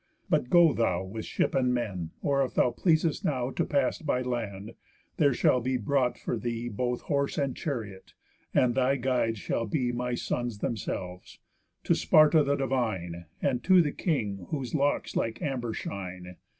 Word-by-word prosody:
But 125 - +2
go 170 -2 +6
thou 95 -6 0
With 105 +4 -6
ship - - 0
and 125 -1 +2
men 95 -9 -3
(or, 140 -1 +2
if 130 - -4
thou 125 - +3
pleasest 160 +4 +1
now 130 -3 -1
To - - 0
pass 140 -3 0
by 130 -5 -1
land, 110 -5 -4 0.4
there 145 -2 +4
shall 125 0 +2
be 130 +2 0
brought 125 +1 0
for 120 - -3
thee 120 0 -3
Both 125 +3 -2
horse 140 -1 -1
and 140 -3 0
chariot, 110 -10 -5 0.4
and 125 -1 +3
thy 130 +1 +2
guides 125 -3 0
shall 115 +3 -2
be 125 +1 0
My 125 0 -2
sons 120 -2 -3
themselves) 95 -4 -5 0.5
to - - +3
Sparta 155 0 +5
the 140 0 +1
divine, 110 -11 -2 0.2
And 125 -3 0
to 185 -1 +6
the 155 -4 +3
king 105 - -2
whose 135 -5 -4
locks 145 -1 0
like 115 0 -1
amber 130 -7 -2
shine. 90 -4 -6
125 Hz, 170 wpm, -28 LUFS, 110-140 Hz, 0.5 s, go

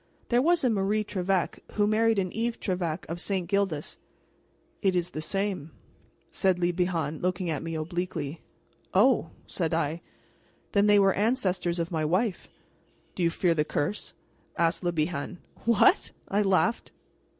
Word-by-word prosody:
"There 240 0 +4
was 340 +3 +3
a 255 - +4
Marie 210 +1 +1
Trevec 190 -3 -1
who 205 - +2
married 220 +1 +3
an 185 -2 0
Yves 230 +1 -2
Trevec 180 -4 -2
of 170 +2 -5
St. 190 -3 -1
Gildas 195 -6 -1 0.4
" - - -39
"It 190 -3 +2
is 175 0 0
the 155 - -4
same," 195 -2 -2 0.6
said 190 -2 +2
Le 175 0 +1
Bihan, 170 -4 -1
looking 180 -1 -1
at 150 - -2
me 165 0 -4
obliquely. 160 -2 -3 0.5
"Oh!" - - +4 0.2
said - - -1
I; 155 +4 -1 0.7
"then 205 0 +3
they 205 0 +6
were 195 -1 +5
ancestors 195 -6 0
of 170 +1 -2
my 160 -2 0
wife." 185 +6 0 0.6
"Do - - -5
you 170 - +4
fear 170 +1 +1
the 150 -2 +1
curse?" 155 +6 -3 0.4
asked 170 +2 +1
Le 175 - +1
Bihan. 155 0 -2 0.3
"What?" 230 -3 +4 0.2
I 205 +2 +2
laughed. 200 +4 +1
180 Hz, 160 wpm, -28 LUFS, 165-205 Hz, 0.7 s, they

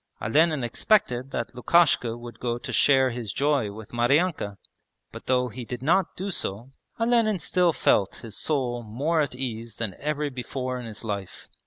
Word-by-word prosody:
Olenin 150 +4 +2
expected 130 - +1
that 120 -2 -4
Lukishka 125 -3 +3
would 120 0 -10
go 120 -1 -1
to - - -6
share 135 -2 +4
his 115 -4 -4
joy 140 -7 +1
with 110 +1 -10
Maryanka, 120 - +1 0.5
but - - -10
though 125 -1 +2
he 120 +3 -7
did 120 +2 -6
not 175 +4 +2
do 195 +2 -3
so 115 - -4 0.3
Olenin 230 -3 +3
still 180 +1 +2
felt 100 -9 +2
his 110 -3 -7
soul 125 -5 -1
more 140 +9 0
at 140 -4 -2
ease 115 -3 -4
than 110 -4 -3
ever 150 0 -1
before 130 0 -4
in 120 - -7
his 110 0 -6
life. 100 -4 -5
125 Hz, 170 wpm, -26 LUFS, 115-150 Hz, 0.5 s, share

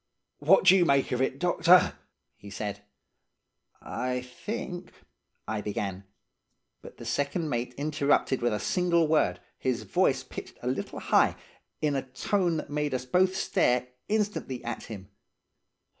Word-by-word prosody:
"'What 485 - +5
do - - +8
you 185 - +5
make 140 -4 +2
of 125 0 0
it, 130 0 0
doctor?' 180 +2 +5 0.4
he 100 - -12
said. 100 0 -5 1.0
"'I 125 0 -2
think 175 - -6 0.2
— 70 0 -51
' - - -48
I 110 -1 -2
began. 100 -2 -4 0.8
But - - -12
the - - -9
second 150 +3 -1
mate 120 +1 -2
interrupted 145 -3 +1
with 120 - +2
a 105 - -1
single 170 - +2
word, 120 - +2 0.2
his 130 -3 -1
voice - - +1
pitched - - -9
a - - -3
little - - -3
high, - - +3 0.5
in 150 -2 +2
a 135 - +1
tone 175 +2 +1
that 150 - -6
made 150 -2 -1
us 125 0 -3
both 185 +8 +2
stare 125 -7 +1 0.2
instantly 210 - -1
at 120 - -4
him. 100 -3 -9
135 Hz, 155 wpm, -28 LUFS, 120-170 Hz, 1.0 s, do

